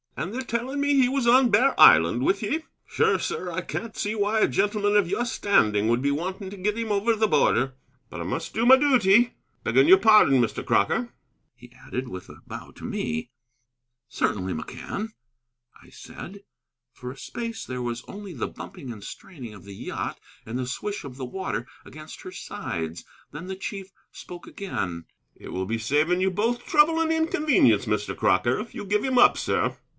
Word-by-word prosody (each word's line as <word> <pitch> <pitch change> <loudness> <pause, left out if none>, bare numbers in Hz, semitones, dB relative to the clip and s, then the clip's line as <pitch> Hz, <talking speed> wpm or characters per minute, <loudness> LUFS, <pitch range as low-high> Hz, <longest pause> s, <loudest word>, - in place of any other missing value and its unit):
"And 185 - -4
they're 260 - -3
telling 255 +3 -3
me 285 0 +2
he 255 - +5
was 270 -2 0
on 250 +1 +6
Bear 255 +7 +3
Island 85 +10 +7
with 195 +2 +1
ye? 310 +10 -1 0.2
Sure, - - +2
sir, 455 - -4
and - - -6
I - - 0
can't 230 -1 -6
see 210 - -2
why 215 +1 0
a - - +5
gentleman 205 +1 +1
of 205 -4 +4
your 240 +6 0
standing 110 - +2
would 120 +2 +2
be 140 +1 +1
wanting 185 +6 -4
to 200 - -9
get 210 +3 -1
him 225 -2 -3
over 210 +3 +2
the 220 0 +2
border. 130 - +2 0.3
But - - -8
I - - -3
must - - -4
do 230 - 0
my 260 +2 +9
duty. 240 -4 +4 0.3
Begging 130 +5 +3
your 190 +2 +8
pardon, 210 - +6
Mr. 115 -3 -2
Crocker," 235 - +1 0.4
he 120 0 -16 0.2
added, 130 +1 -4
with 90 -3 -8
a - - -14
bow - - -9
to - - -15
me. 80 +8 -3 0.8
"Certainly, 95 -2 -1
McCann," 205 - -5 0.7
I - - -18
said. 195 +3 -11 0.5
For 125 -1 -8
a 135 - -12
space 230 - -6
there 125 -1 -5
was 120 -1 -4
only 200 -2 -8
the 130 - -3
bumping 165 -10 -9
and 105 -3 -10
straining 125 - -10
of 100 - -13
the 100 -1 -10
yacht - - -5 0.3
and 115 +2 -4
the 130 -1 -3
swish 205 +11 -4
of 130 -2 -9
the 130 - -5
water 130 -5 -4 0.2
against 155 0 -11
her 185 - -9
sides. 85 - -6 0.3
Then 165 +6 -8
the 190 - -4
chief 195 0 -7 0.2
spoke 175 -1 -10
again. 90 - -5 0.3
"It - - -12
will 95 0 -3
be 115 +4 -2
saving 150 +10 +1
you 190 0 +2
both 230 +6 -1
trouble 320 +1 +4
and 325 0 +1
inconvenience, 300 - +3
Mr. 105 -1 -2
Crocker, 120 +7 +2
if 230 - -8
you - - -5
give 210 +1 0
him 260 -1 0
up, 245 - +6
sir." - - -1
190 Hz, 195 wpm, -25 LUFS, -, 0.8 s, my